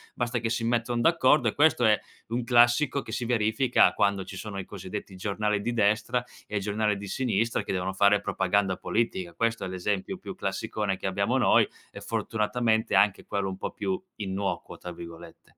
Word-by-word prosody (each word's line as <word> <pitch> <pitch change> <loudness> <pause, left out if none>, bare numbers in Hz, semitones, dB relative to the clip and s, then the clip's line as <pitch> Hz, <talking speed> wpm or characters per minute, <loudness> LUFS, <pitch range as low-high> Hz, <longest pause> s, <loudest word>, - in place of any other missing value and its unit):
basta 120 0 -1
che 115 0 -2
si 115 0 -1
mettono 120 +1 0
d'accordo. 130 -4 +4
E - - +1
questo 145 -5 +4
è 105 -1 +4 0.3
un 120 +1 -1
classico 120 +3 +4
che - - -9
si 120 - -2
verifica 120 +2 +3
quando 100 -1 +1
ci 95 - -9
sono 100 0 -6
i, 95 - -4
cosiddetti, 95 0 -7
giornali 105 +2 -1
di 120 +3 -2
destra 110 +3 +1 0.2
e 105 - -3
giornali 105 +1 0
di 100 0 -7
sinistra 115 -1 0
che - - -5
devono 95 0 -2
fare 100 +1 +4
propaganda 95 -1 0
politica. 95 -7 -2
Questo 115 -1 0
è - - -3
l'esempio 95 +1 -2
più - - -8
classicone 100 -3 -2
che - - -8
abbiamo 100 +7 +1
noi 125 - +4 0.2
e - - -10
fortunatamente 110 0 0
anche 100 -1 +3
quello 100 -2 -2
un 95 - -6
po' - - -3
più 185 -1 -3
"innocuo" 100 -1 -4
tra 90 - -7
virgolette. 85 0 -12
105 Hz, 185 wpm, -27 LUFS, 95-120 Hz, 0.3 s, d'accordo